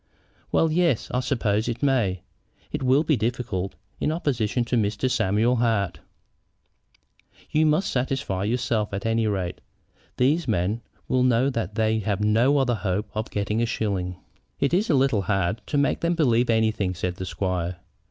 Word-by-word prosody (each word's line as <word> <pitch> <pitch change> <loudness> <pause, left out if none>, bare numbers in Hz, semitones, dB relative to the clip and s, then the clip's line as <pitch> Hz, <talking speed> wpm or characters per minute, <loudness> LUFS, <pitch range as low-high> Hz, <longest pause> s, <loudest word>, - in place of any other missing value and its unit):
"Well, 160 - +3
yes; 165 -7 +1
I 125 - +1
suppose 110 -4 0
it 120 +4 -4
may. 110 -10 +1 0.5
It 150 - -3
will 130 +3 +3
be 155 -1 +2
difficult, 110 -6 -2 0.2
in 150 - 0
opposition 125 -7 0
to 125 - -1
Mr. 105 +2 +1
Samuel 115 +1 +2
Hart." 110 -5 0 1.5
"You 155 +1 +3
must 155 +6 +2
satisfy 125 -7 -1
yourselves, 115 -2 -1
at 100 +1 -4
any 115 0 +1
rate. 95 -4 -2 0.6
These 145 +5 +2
men 105 +2 0 0.3
will 130 - +2
know 125 +2 +3
that 110 -5 -3
they 110 0 +1
have 100 -2 -1
no 115 +7 +3
other 130 -3 +2
hope 105 -1 -2
of 110 0 -3
getting 105 +2 -1
a 120 - +1
shilling." 95 -5 -2 0.4
"It 140 - +1
is 200 +5 +2
a 155 - +4
little 130 -6 +3
hard 95 +1 0
to 145 - -1
make 140 0 +2
them 170 +1 0
believe 125 -7 +2
anything," 110 -4 +1
said 90 +1 -3
the 95 - -4
squire. 90 -2 -2
115 Hz, 165 wpm, -25 LUFS, 100-130 Hz, 1.5 s, a